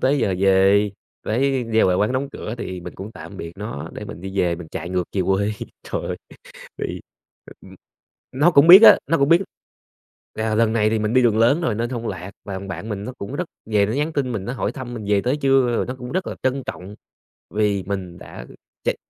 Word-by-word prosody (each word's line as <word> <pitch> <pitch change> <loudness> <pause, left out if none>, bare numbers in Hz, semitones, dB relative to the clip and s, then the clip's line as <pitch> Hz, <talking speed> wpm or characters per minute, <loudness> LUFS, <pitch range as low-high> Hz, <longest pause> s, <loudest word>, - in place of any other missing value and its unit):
tới 140 +2 +2
giờ 100 -6 +1
về 100 +2 +4 0.4
với 130 +3 +1
giao 110 - +4
lại 90 - +2
quán 105 +6 +1
đóng 135 +2 -1
cửa 110 - -6
thì 90 -5 -5
mình - - -9
cũng 100 +4 -8
tạm 100 - -10
biệt 85 -1 -7
nó 105 -8 -6
để - - -7
mình 80 - -9
đi 95 +1 -6
về, 85 -2 +2
mình 85 -2 -10
chạy 85 - -5
ngược 90 -1 0
về 100 - 0
quê, 95 +3 +1 0.3
trời - - -4
ơi - - -4 0.6
thì - - -4 0.6
ừm, - - -14 0.6
nó 145 +7 +3
cũng 150 0 +6
biết 190 +5 +11
á - - +10
nó 165 - +2
cũng 140 +2 +2
biết 170 +3 +6 0.9
là 110 0 -1
lần 110 0 +2
này 110 -2 +2
thì 110 - +1
mình 105 +2 -1
đi 130 - +5
đường 110 -2 +3
lớn 120 +9 +4
rồi 120 -10 0
nên 120 +2 -2
hông 120 -2 -4
lạc 95 0 -6
và 100 - -6
thằng 95 +1 -6
bạn 90 +4 -6
mình 105 -2 -4
nó 125 - -5
cũng 100 +7 -6
rất 180 - -1 0.3
về 105 -2 +3
nó 110 - -2
nhắn 150 +4 -1
tin 135 -4 -1
mình, 105 -4 -4
nó 120 - -4
hỏi 130 - -2
thăm 130 -3 -7
mình 110 -3 -6
về 100 -1 +3
tới 130 +4 0
chưa? 135 -3 +3
Rồi - - -1
nó 125 - -4
cũng 125 0 -7
rất 185 0 -1
là - - -4
trân 130 +1 0
trọng, 95 +3 -7 0.6
vì 105 -2 +1
mình 95 -3 -5
đã - - -10 0.4
chạy - - 0
110 Hz, 240 wpm, -22 LUFS, 95-130 Hz, 0.9 s, biết